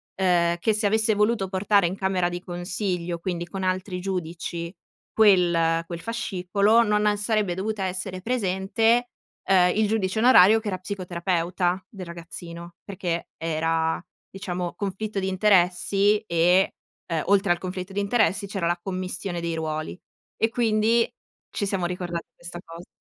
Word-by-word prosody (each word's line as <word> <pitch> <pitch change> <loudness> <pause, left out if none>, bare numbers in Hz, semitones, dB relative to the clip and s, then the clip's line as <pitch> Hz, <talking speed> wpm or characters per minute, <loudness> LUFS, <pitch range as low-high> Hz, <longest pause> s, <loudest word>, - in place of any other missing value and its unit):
ehm, 175 -2 +2
che 220 +4 +1
se 215 +1 0
avesse 220 +2 +3
voluto 210 -1 +1
portare 195 0 +2
in 185 - -3
camera 190 -2 0
di 175 0 -5
consiglio, 175 -1 -3
quindi 175 -1 -4
con 190 +1 -5
altri 185 0 -2
giudici, 170 -2 -4 0.5
quel 170 -5 +4
quel 170 -1 -6
fascicolo 210 0 +1
non, 210 -1 +2
ehm, 205 - +3
sarebbe 205 -3 0
dovuta 205 +2 -3
essere 185 0 -4
presente, 225 +2 +1 0.4
ehm, 180 -2 +4
il 215 0 +2
giudice 210 -1 0
onorario 225 -3 +7
che 220 - -8
era 185 - -1
psicoterapeuta 180 -1 -2
del 190 -4 -8
ragazzino, 170 0 -9
perché 180 -4 -4
era 160 0 0 0.3
diciamo 180 -2 -4
conflitto 200 +1 -3
di 190 - -2
interessi, 195 +1 +3
e, 180 -2 +2 0.3
ehm, 165 -3 -1
oltre 195 -1 +3
al 175 - +3
conflitto 185 +1 -6
di 205 - -1
interessi 205 -1 +1
c'era 195 -4 -2
la 175 0 0
commistione 185 -1 -4
dei 170 -1 -2
ruoli, 155 +2 -4 0.4
e 225 - +3
quindi 230 0 +2 0.4
ci 200 - -2
siamo 190 -3 -1
ricordati 175 -1 -4
questa 175 0 -9
cosa. 165 +2 -11
185 Hz, 150 wpm, -25 LUFS, 175-205 Hz, 0.5 s, onorario